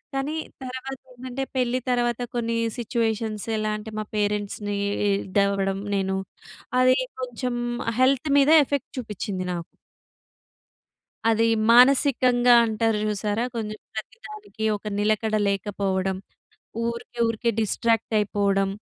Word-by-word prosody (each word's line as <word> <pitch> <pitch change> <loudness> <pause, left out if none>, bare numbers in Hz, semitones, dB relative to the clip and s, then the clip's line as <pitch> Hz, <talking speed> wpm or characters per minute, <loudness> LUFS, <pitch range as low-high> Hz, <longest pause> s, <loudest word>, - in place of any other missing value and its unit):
కానీ 280 +3 -1 0.3
తర్వాత 260 +1 -5 0.2
ఏంటంటే 255 +2 -5
పెళ్లి 250 0 +1
తర్వాత 240 -1 +1 0.2
కొన్ని 230 -1 -1 0.2
సిట్యుయేషన్స్ 225 -2 -2
ఎలా 215 0 -1
అంటే 215 +1 -8
మా - - -1
పేరెంట్స్‌ని 205 0 -1 0.3
ఇదవ్వడం 195 0 +1 0.2
నేను, 190 0 0 0.6
అది 255 0 +5 0.2
కొంచెం 250 0 -3 0.4
హెల్త్ 270 +3 +3
మీద 285 +2 +5
ఎఫెక్ట్ 280 -2 -3
చూపిచ్చింది 205 -5 -4
నాకు. 170 -1 -4 1.7
అది, 225 0 +3 0.2
మానసికంగా 250 -1 +5
అంటారు 220 0 +1
చూసారా! 210 +2 -1
కొంచెం 215 -1 -4 0.2
ప్రతిదానికి 415 - -7
ఒక 210 - -27
నిలకడ 215 +1 +1
లేకపోవడం. 195 -1 -1 0.7
ఊరికే 235 +1 -5
ఊరికే 230 +1 0
డిస్ట్రాక్ట్ 225 +2 0
అయిపోవడం. 200 -1 +1
225 Hz, 105 wpm, -24 LUFS, 205-250 Hz, 1.7 s, అది